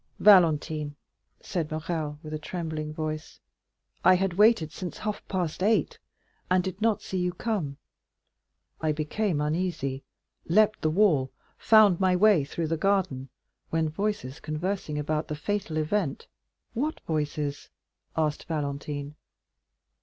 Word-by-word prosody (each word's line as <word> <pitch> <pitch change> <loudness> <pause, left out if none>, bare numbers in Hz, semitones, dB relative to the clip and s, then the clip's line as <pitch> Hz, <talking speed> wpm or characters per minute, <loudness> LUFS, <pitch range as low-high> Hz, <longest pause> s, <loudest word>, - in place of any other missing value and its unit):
"Valentine," 160 -6 +4 0.5
said 170 -5 -3
Morrel 155 -1 -3
with 155 0 -7
a 155 - -3
trembling 155 -2 -4
voice, 155 0 -5 0.6
"I 185 - +7
had 190 0 0
waited 205 -5 +4
since 180 +2 -6
half 210 -1 -3
past 180 -3 -2
eight, 215 +3 +2 0.5
and 180 0 +3
did 190 +2 -5
not 215 -2 +2
see 190 - -3
you 180 0 0
come; 180 -11 -2 1.0
I 155 -1 +1
became 155 +3 -1
uneasy, 150 -3 -1 0.5
leaped 215 +5 +3
the 155 - +2
wall, 155 -7 +3 0.3
found 215 -5 +6
my 185 -1 +3
way 200 -4 +5
through 155 +3 -3
the 165 - 0
garden, 175 -8 0 0.4
when 160 -1 +1
voices 160 -6 -3
conversing 155 0 -3
about 150 +1 -1
the 150 - -3
fatal 175 0 -2
event——" 155 -1 -1 0.5
"What 290 +7 -2
voices?" 150 -2 -3 0.5
asked 155 -2 0
Valentine. 145 -1 -3
160 Hz, 130 wpm, -27 LUFS, 150-195 Hz, 1.0 s, I